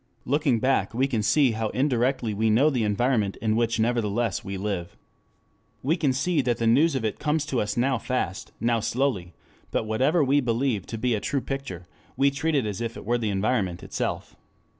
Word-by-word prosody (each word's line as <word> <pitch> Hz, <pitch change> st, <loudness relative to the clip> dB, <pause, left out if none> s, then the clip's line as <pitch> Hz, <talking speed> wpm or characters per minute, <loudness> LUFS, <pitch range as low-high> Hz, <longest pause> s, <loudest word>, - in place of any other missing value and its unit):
Looking 140 Hz, -3 st, +2 dB
back 130 Hz, -1 st, +1 dB
we 130 Hz, +3 st, +2 dB
can 120 Hz, -5 st, -1 dB
see 130 Hz, +4 st, +3 dB
how 110 Hz, 0 st, -2 dB
indirectly 125 Hz, -3 st, +1 dB
we 110 Hz, +2 st, +1 dB
know 135 Hz, +8 st, +4 dB
the 125 Hz, -5 st, 0 dB
environment 105 Hz, -1 st, +1 dB
in 110 Hz, -1 st, 0 dB
which 115 Hz, 0 st, +1 dB
nevertheless 115 Hz, -2 st, 0 dB
we 95 Hz, 0 st, -5 dB
live. 95 Hz, -3 st, -4 dB, 0.9 s
We 150 Hz, +6 st, +2 dB
can 150 Hz, -6 st, +1 dB
see 145 Hz, +4 st, +1 dB
that 120 Hz, -2 st, 0 dB
the 115 Hz, -, -1 dB
news 140 Hz, +7 st, +4 dB
of 125 Hz, -4 st, -1 dB
it 110 Hz, -, -2 dB
comes 150 Hz, 0 st, 0 dB
to 135 Hz, -5 st, -1 dB
us 105 Hz, +2 st, -3 dB
now 130 Hz, 0 st, +1 dB
fast, 105 Hz, -7 st, -3 dB
now 115 Hz, +1 st, +1 dB
slowly; 110 Hz, -7 st, -1 dB, 0.3 s
but -, -, 0 dB
that -, -, -7 dB
whatever 135 Hz, +9 st, +2 dB
we 140 Hz, +2 st, +3 dB
believe 115 Hz, -4 st, -1 dB
to 115 Hz, -, -5 dB
be 125 Hz, +2 st, 0 dB
a 110 Hz, -, 0 dB
true 135 Hz, +6 st, -1 dB
picture, 135 Hz, -12 st, -5 dB, 0.3 s
we 140 Hz, +1 st, +4 dB
treat 150 Hz, +3 st, -1 dB
as 110 Hz, -6 st, -1 dB
if 115 Hz, -1 st, -4 dB
it -, -, -9 dB
were 120 Hz, +2 st, +1 dB
the 110 Hz, -2 st, -1 dB
environment 100 Hz, -3 st, -1 dB
itself. -, -, -4 dB
120 Hz, 205 wpm, -25 LUFS, 110-135 Hz, 0.9 s, know